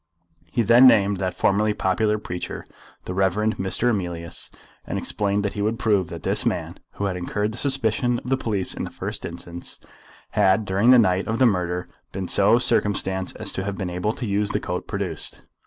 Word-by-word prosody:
He 120 - +1
then 120 +4 +7
named 100 -4 +4
that 95 -2 -2
formerly 105 +2 +2
popular 105 +3 +1
preacher, 90 -4 -6 0.4
the 90 - -4
Rev. 95 -1 +2 0.3
Mr. 105 +6 +1
Emilius, 85 -5 -4 0.3
and - - -4
explained 100 0 -1
that 100 - -1
he 105 - -3
would 110 +2 0
prove 100 -6 +2
that - - -8
this - - +2
man, - - -2
who 100 - -3
had 95 -2 -1
incurred 105 +4 -2
the 110 - -5
suspicion 125 -2 +1
of 120 - -9
the - - +5
police 105 -7 -1
in - - -5
the - - -4
first - - -5
instance, 85 0 -6 0.5
had 105 +1 +3
during 100 +5 +2
the 130 - +9
night 95 -4 +3
of 110 - -1
the 130 - +4
murder 90 -4 0 0.3
been 95 -1 -3
so 100 +6 +5
circumstanced 95 -6 0
as - - -5
to 95 - -2
have 100 0 -4
been 95 -3 -3
able 90 +4 -1
to 120 - -5
use 100 0 0
the - - 0
coat - - -4
produced. - - -4
100 Hz, 200 wpm, -23 LUFS, 95-110 Hz, 0.5 s, the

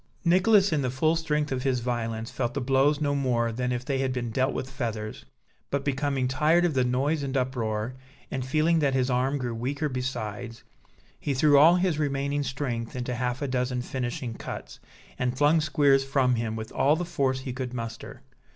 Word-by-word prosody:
Nicholas, 190 +2 +4
in 150 - +1
the 130 - 0
full 155 +6 +1
strength 150 -3 -1
of 130 -1 -1
his 130 -2 +1
violence, 115 -2 -3
felt 120 -2 -2
the - - 0
blows 135 +3 +2
no 145 -2 +1
more 125 -4 +1
than 125 +2 -2
if 125 0 -3
they 135 -2 -1
had 135 -1 0
been 120 -2 -3
dealt 130 +4 +1
with 130 - -4
feathers; 115 -5 -5 0.4
but, 140 0 -2
becoming 140 -2 0
tired 155 +7 +3
of 170 - +1
the 130 -2 +2
noise 135 +5 0
and 135 -1 -2
uproar, 120 -3 -1 0.4
and 130 -1 -2
feeling 155 +5 +2
that 140 -3 +1
his 130 0 +1
arm 130 +3 +1
grew 125 -3 -3
weaker 135 +6 -2
besides, 120 -3 -4 0.6
he 140 - -2
threw 145 +2 +4
all 165 +4 +7
his 180 -4 +1
remaining 140 0 0
strength 130 -4 -3
into 125 0 -3
half 125 +2 -2
a - - -1
dozen 125 -1 -1
finishing 125 -2 -4
cuts, - - -8 0.4
and 125 0 -1
flung 150 +3 +4
Squeers 140 -3 +3
from 135 -2 +2
him, 115 -2 -2
with 110 0 -6
all 145 +3 +3
the 175 +2 -3
force 130 -5 0
he 130 -1 -5
could 130 -1 -4
muster. 115 -2 -7
130 Hz, 195 wpm, -27 LUFS, 125-145 Hz, 0.6 s, all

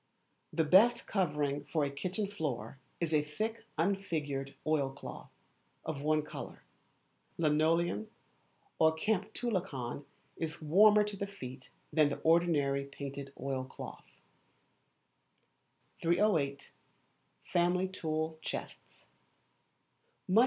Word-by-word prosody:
The 160 - +2
best 220 +10 +6
covering 150 -7 0
for 150 0 0
a 140 - -2
Kitchen 185 +8 -2
Floor 140 - -4 0.2
is 165 -2 -1
a 150 - +5
thick 215 +10 -4
unfigured 155 -7 -1
oil 150 -3 +2
cloth, 135 +2 -9 0.6
of 150 -3 -3
one 155 +1 +2
colour. - - -8 0.7
Linoleum 155 -7 +2 0.7
or 160 0 +6
kamptulicon 190 - -1 0.3
is 160 -1 -3
warmer 210 +7 +6
to 210 0 -4
the 200 +1 -3
feet 130 -9 -9 0.2
than 155 -2 +5
the - - -3
ordinary 155 -5 +3
painted 140 0 -7
oilcloth. 130 -1 -5 2.0
308. 165 -6 +2 0.7
Family 180 +1 +2
Tool 160 -3 -2
Chests. - - -6
155 Hz, 95 wpm, -33 LUFS, 140-185 Hz, 2.0 s, best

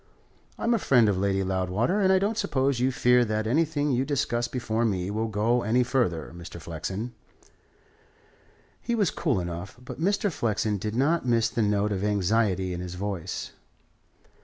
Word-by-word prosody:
I'm 235 - +1
a 230 - +2
friend 125 - +4
of 100 -3 +1
Lady 95 0 +1
Loudwater, 95 - 0
and 190 -1 +4
I 190 - +5
don't 200 +4 0
suppose 135 - 0
you 130 +2 +2
fear 125 0 +4
that 110 -1 -1
anything 150 +3 +1
you 130 0 +1
discuss 125 -4 -1
before 120 -2 -2
me 95 -4 -1
will 110 +2 -1
go 110 +3 +1
any 120 +4 +2
further, 115 - -1
Mr. 85 0 -9
Flexen." 95 +9 -5 1.7
He 235 - -1
was 205 -5 +2
cool 145 - 0
enough, 85 +3 -6
but 125 +4 -9
Mr. 200 +2 +1
Flexen 110 -6 -1
did 105 +3 -3
not 145 +3 +1
miss 115 -1 +3
the 115 - -1
note 105 0 +1
of 100 -1 -2
anxiety 100 -2 +1
in 90 - -4
his 90 0 -6
voice. 95 -3 -4
115 Hz, 170 wpm, -26 LUFS, 95-130 Hz, 1.7 s, I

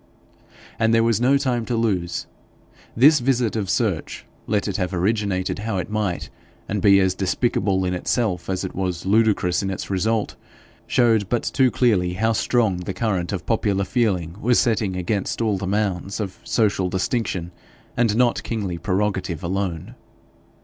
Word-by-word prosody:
And 115 0 +3
there 115 - +4
was 115 -1 +1
no 135 +3 +4
time 125 -4 -1
to 120 - -2
lose. 95 -7 -1 0.7
This 145 +5 +6
visit 120 -3 +1
of 100 -4 -2
search, - - -1 0.2
let 105 -1 0
it 100 - -2
have 90 -1 -2
originated 100 0 0
how 105 -1 -2
it 90 - -4
might, 105 -5 -2 0.4
and 105 0 -2
be 100 -2 +6
as 95 -1 +2
despicable 95 0 0
in 90 - -1
itself 90 -1 -1
as 95 0 -1
it 95 - -5
was 90 -2 -3
ludicrous 105 -3 +2
in 95 - -2
its 95 +1 -5
result, 105 +3 0 0.5
showed 115 -5 +2
but 120 - 0
too 130 -2 +2
clearly 100 -9 +2
how 110 +5 +1
strong 110 -3 +1
the 90 +1 -5
current 95 -6 -1
of 95 -3 -4
popular 100 -3 +1
feeling 95 -8 0
was 120 +1 +3
setting 110 -5 +1
against 90 +2 -2
all 110 -4 0
the 95 - -4
mounds 100 -1 -1
of 100 -3 -5
social 100 -5 +1
distinction, 95 -3 -2 0.4
and 115 -3 +2
not 120 0 +2
kingly 100 -7 -3
prerogative 95 -3 -1
alone. 90 +2 -3
100 Hz, 165 wpm, -22 LUFS, 95-115 Hz, 0.7 s, This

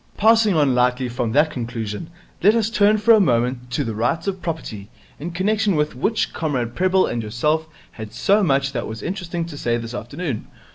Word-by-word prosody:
Passing 220 -2 +4
on 145 -4 +3
lightly 125 +1 +1
from 120 -1 -2
that 150 +3 +3
conclusion, 115 +2 -5 0.3
let 210 +4 +5
us 225 -1 +1
turn 210 -1 +4
for 220 +2 +5
a 220 - +6
moment 125 - +1
to 125 +4 -1
the 115 -3 -3
Rights 120 +9 -1
of 190 -2 -3
Property, 115 - -5 0.3
in 160 +4 -5
connection 200 +3 +1
with 150 0 0
which 210 - -1
Comrade 130 -7 -2
Prebble 185 +4 +2
and 120 - -2
yourself 150 +9 -1 0.2
had 110 -2 -9
so 195 - +2
much 135 -6 +1
that 120 -3 -3
was 110 0 -7
interesting 175 -2 -3
to 165 -3 -9
say 120 -4 -1
this 115 0 -6
afternoon. 120 +2 -5
145 Hz, 195 wpm, -21 LUFS, 120-185 Hz, 0.3 s, a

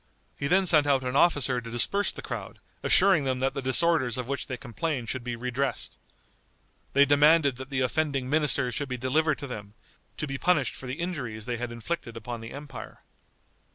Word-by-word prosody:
He 140 - -2
then 190 +5 +4
sent 155 -4 +4
out 135 -2 +3
an 125 +1 -3
officer 140 -6 +3
to 115 - -9
disperse 200 - +2
the - - -9
crowd, - - -6 0.2
assuring 190 -6 +5
them 130 -1 0
that 135 +1 0
the 140 - -3
disorders 130 -2 +2
of 125 -1 -4
which 140 +1 -3
they 130 - -4
complained 125 0 -3
should 130 -2 -3
be 120 -1 -3
redressed. 125 +3 -3 0.9
They 140 +1 +6
demanded 145 -1 +4
that 130 +1 -8
the 130 -2 -1
offending 135 0 0
ministers 145 -4 +1
should 145 +2 -3
be 125 - -3
delivered 150 +5 +1
to - - -6
them, 105 -5 -8 0.4
to - - -2
be 140 -2 -5
punished 170 -6 +2
for 130 - -9
the 125 - -3
injuries 140 - -4
they 120 -1 -2
had 120 0 -4
inflicted 120 0 -5
upon 120 0 -6
the 115 - -8
empire. 145 0 -9
135 Hz, 195 wpm, -27 LUFS, 125-150 Hz, 0.9 s, They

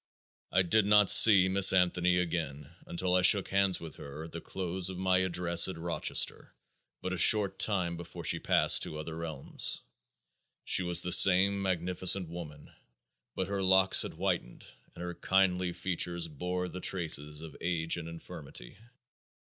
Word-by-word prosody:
I 95 - +1
did 100 +3 0
not 105 -1 +4
see 100 -4 +7
Miss 95 +1 +6
Anthony 90 -1 0
again 80 -5 -5 0.2
until 90 +1 -3
I 90 - +2
shook 95 +1 +4
hands 100 -1 -1
with 80 -2 -9
her 70 +2 -11
at 80 - -12
the 85 - -9
close 95 0 -4
of 95 - -9
my 95 0 0
address 90 -2 +1
in 95 - -8
Rochester, 85 0 -2 0.5
but 95 - -5
a 90 - -4
short 105 -2 +4
time 90 -5 -2
before 85 - -11
she - - 0
passed - - +2
to 75 - -6
other 80 +1 -8
realms. 80 -4 -3 0.8
She - - +3
was 90 -1 +3
the 90 - -4
same 95 +2 +5
magnificent 90 0 0
woman, 75 -4 -11 0.6
but 95 - -4
her 100 0 -5
locks 95 0 +3
had - - -5
whitened 90 -7 -5 0.3
and 85 - -10
her 90 0 -7
kindly 90 0 -1
features 85 -1 -5
bore 90 +4 -6
the 90 +1 -10
traces 75 -5 -2
of 80 -3 -12
age 85 -2 -2
and 85 -1 -8
infirmity. 85 -3 -10
90 Hz, 165 wpm, -28 LUFS, 85-95 Hz, 0.8 s, see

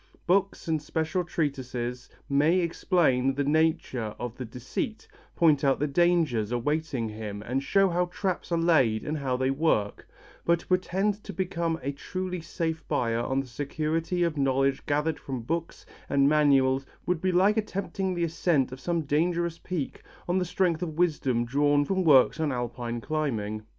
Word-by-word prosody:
Books 195 +1 +1
and 160 -2 0
special 160 +5 -1
treatises 130 -7 -3 0.2
may 150 +5 +3
explain 160 -7 +2
the 145 - 0
nature 145 -7 0
of 120 -1 -5
the 130 - -6
deceit, 130 - -5 0.3
point 155 -4 +4
out 135 -1 +3
the 150 - +1
dangers 150 -8 +2
awaiting 135 0 -1
him 105 -1 -6
and 130 +4 -1
show 195 +7 +3
how 180 0 +1
traps 185 0 -3
are 170 - +2
laid 145 -10 +3
and 150 0 -3
how 130 -2 -1
they 130 +1 +1
work, 135 -9 0 0.4
but 170 0 +2
to - - -17
pretend 195 +3 0
to - - -7
become 170 -3 -2
a 140 - -1
truly 180 +5 -5
safe 160 -1 -3
buyer 115 -1 0
on 130 +3 0
the - - -8
security 155 +7 -2
of 165 -3 -1
knowledge 135 0 +1
gathered 150 +2 0
from 130 -3 -5
books 165 +6 -4 0.2
and 140 0 +4
manuals 135 -3 +4 0.2
would 180 -2 0
be 185 - +1
like 190 +4 +4
attempting 195 -2 -2
the 170 - -1
ascent 160 -5 +1
of 130 - -8
some 170 +3 -1
dangerous 165 +3 0
peak 170 -7 -4 0.3
on 180 +2 +2
the 180 - 0
strength 175 -2 0
of 160 -3 -4
wisdom 135 -9 +1
drawn 145 +3 +2
from 190 +4 0
works 145 -1 +5
on 155 -2 0
Alpine 120 -1 -3
climbing. 110 -8 -2
150 Hz, 170 wpm, -27 LUFS, 130-175 Hz, 0.4 s, works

